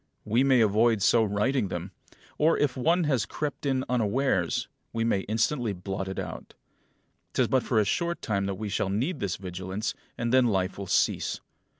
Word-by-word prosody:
We 115 +5 +3
may 130 -3 +4
avoid 110 0 +3
so 115 +1 +5
writing 105 +3 +1
them; 90 +1 -5 0.5
or, 160 +2 +4
if 145 -4 +1
one 165 +7 +2
has 130 -8 +1
crept 150 -1 -4
in 130 -1 0
unawares, 120 -5 +1 0.2
we 115 - -1
may 115 -4 +2
instantly 115 +1 0
blot 95 +1 -4
it 95 - -5
out. - - -6 0.8
'Tis - - +2
but 130 - +2
for 120 - -1
a 105 - +3
short 170 - -1
time 100 -4 -1
that 100 - -2
we 105 +2 -5
shall 100 -1 -1
need 125 - -1
this 100 -4 -1
vigilance, 95 +2 -4 0.2
and 115 +1 -1
then 130 -1 +5
life 95 -3 0
will 100 - -5
cease. - - +1
110 Hz, 185 wpm, -27 LUFS, 100-130 Hz, 0.8 s, so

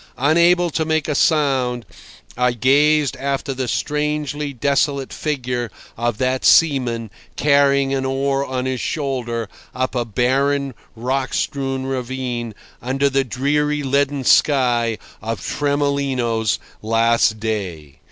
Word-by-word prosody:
Unable 170 +5 +3
to 160 - 0
make 160 -1 0
a 150 - 0
sound, 135 -6 +1 0.5
I 125 0 +2
gazed 145 +4 +3
after 140 0 -2
the 130 -1 -3
strangely 150 +1 -2
desolate 140 +1 0
figure 125 -5 -2 0.3
of 120 -1 -1
that 130 +1 0
seaman 125 -8 +3 0.2
carrying 140 -1 +3
an 135 -1 -1
oar 135 +1 0
on 130 -2 -3
his 130 -1 -2
shoulder 125 -6 -2 0.3
up 130 0 -1
a 125 -2 0
barren, 135 +5 0 0.2
rock 130 +3 -2
strewn 135 -1 -2
ravine 125 -3 -4 0.3
under 135 +3 0
the 135 0 +2
dreary 145 +3 0
leaden 140 0 0
sky 120 -5 +3 0.2
of 115 +1 -3
Tremolino's 140 -6 0 0.2
last 115 0 +2
day. 90 -10 -4
135 Hz, 120 wpm, -20 LUFS, 120-140 Hz, 0.5 s, Unable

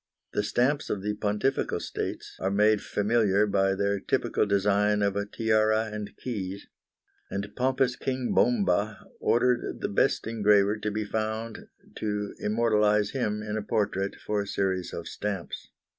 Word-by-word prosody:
The - - +1
stamps 130 +8 +1
of 100 -2 -2
the 105 0 -1
Pontifical 105 +6 0
States - - -5
are 95 - 0
made 105 +1 +3
familiar 105 -1 +2
by 95 -1 +2
their 100 0 0
typical 105 - 0
design 105 +1 +2
of 100 -1 +1
a 100 0 -1
tiara 110 0 +1
and 105 -1 -6
keys, 100 -5 -5 0.6
and 100 +1 -3
pompous 130 0 +1
King 130 -1 -2
Bomba 155 - +2
ordered 120 +1 +1
the - - -1
best - - +1
engraver 105 -2 +3
to 105 - -2
be 105 +1 -2
found 110 +1 -3 0.3
to 105 -1 -2
immortalise 105 -1 +2
him 105 -5 -1
in 105 0 -3
a - - -1
portrait 100 -2 -1
for 105 -1 -2
a 100 - -5
series 95 -2 -1
of - - -6
stamps. 100 -4 -4
105 Hz, 150 wpm, -27 LUFS, 100-110 Hz, 0.6 s, made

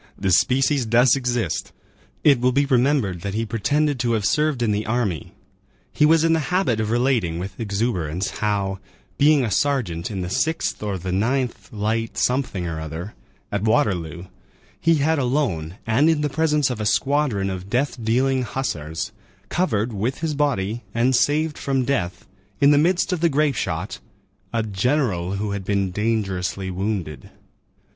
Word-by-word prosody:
The 95 -1 0
species 135 - +3
does 120 +3 +5
exist. 125 - -2 0.5
It 140 -5 +5
will 125 +1 +3
be 140 +3 +2
remembered 125 - +1
that 100 +1 -4
he 115 +1 0
pretended 140 +6 0
to 120 -1 +1
have 105 -3 0
served 140 +4 +1
in 110 - +1
the 105 +1 -1
army; 110 - -1 0.6
he 150 - +4
was 160 0 +4
in 165 0 +3
the 165 - +2
habit 180 - +1
of 110 -1 -1
relating 120 -8 +1
with 95 +2 -6
exuberance, 100 -5 -2
how, 100 -2 -1 0.4
being 145 -1 +5
a 110 - -3
sergeant 115 -9 0
in 100 -4 -4
the 90 - -3
6th 160 - -1
or 105 -2 -2
the 90 +1 -5
9th 115 +1 -1
light 110 +1 -2
something 125 -8 0
or 80 -2 -4
other, 80 +6 -6 0.4
at 100 - -1
Waterloo, 90 -6 0 0.5
he 165 0 +3
had 155 +1 +1
alone, 120 - -1
and 130 +8 +3
in 160 -2 +2
the 150 - 0
presence 150 -2 +1
of 115 -3 -4
a - - -2
squadron 135 -10 +1
of 95 +1 -6
death 125 +1 -1
dealing 130 +4 +2
hussars, 95 - -3 0.4
covered 120 - 0
with 115 +8 -2
his 160 -2 -1
body 120 -7 0
and 125 +3 +3
saved 150 +4 +1
from 135 -2 0
death, 95 -11 -2 0.3
in 140 +1 +6
the 145 - +5
midst 180 +4 +2
of 180 - -1
the 170 +1 +3
grape 150 0 +2
shot, - - -3 0.5
"a 115 -1 0
general, 105 - 0
who 100 +1 -2
had 100 -1 -3
been 100 -1 0
dangerously 95 -3 -1
wounded." 95 -5 -3
115 Hz, 165 wpm, -22 LUFS, 95-140 Hz, 0.6 s, in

